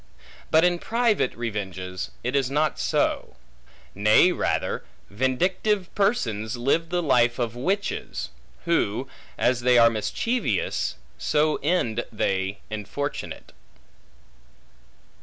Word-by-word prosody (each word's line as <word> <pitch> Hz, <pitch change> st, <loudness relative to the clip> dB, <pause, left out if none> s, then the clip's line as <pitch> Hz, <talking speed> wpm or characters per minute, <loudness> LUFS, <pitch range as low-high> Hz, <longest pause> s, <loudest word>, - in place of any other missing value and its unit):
But 160 Hz, +1 st, +5 dB
in 175 Hz, -1 st, +3 dB
private 230 Hz, -, +1 dB
revenges, 95 Hz, -5 st, -4 dB
it 125 Hz, +3 st, -1 dB
is 135 Hz, -2 st, +2 dB
not 150 Hz, +2 st, 0 dB
so. -, -, 0 dB, 0.6 s
Nay 105 Hz, -, +5 dB
rather, -, -, -1 dB, 0.3 s
vindictive 180 Hz, -, 0 dB
persons 120 Hz, -, 0 dB
live 140 Hz, +7 st, +1 dB
the 175 Hz, 0 st, 0 dB
life 120 Hz, -5 st, +3 dB
of 120 Hz, -2 st, -2 dB
witches; 190 Hz, +11 st, -2 dB, 0.4 s
who, 135 Hz, -7 st, +1 dB, 0.3 s
as 125 Hz, 0 st, +2 dB
they 125 Hz, 0 st, +4 dB
are 115 Hz, -1 st, +7 dB
mischievous, 115 Hz, -, -1 dB, 0.2 s
so 150 Hz, 0 st, +2 dB
end 135 Hz, -8 st, 0 dB
they 95 Hz, -2 st, -1 dB
infortunate. 110 Hz, +7 st, -5 dB
130 Hz, 100 wpm, -25 LUFS, 110-175 Hz, 0.6 s, are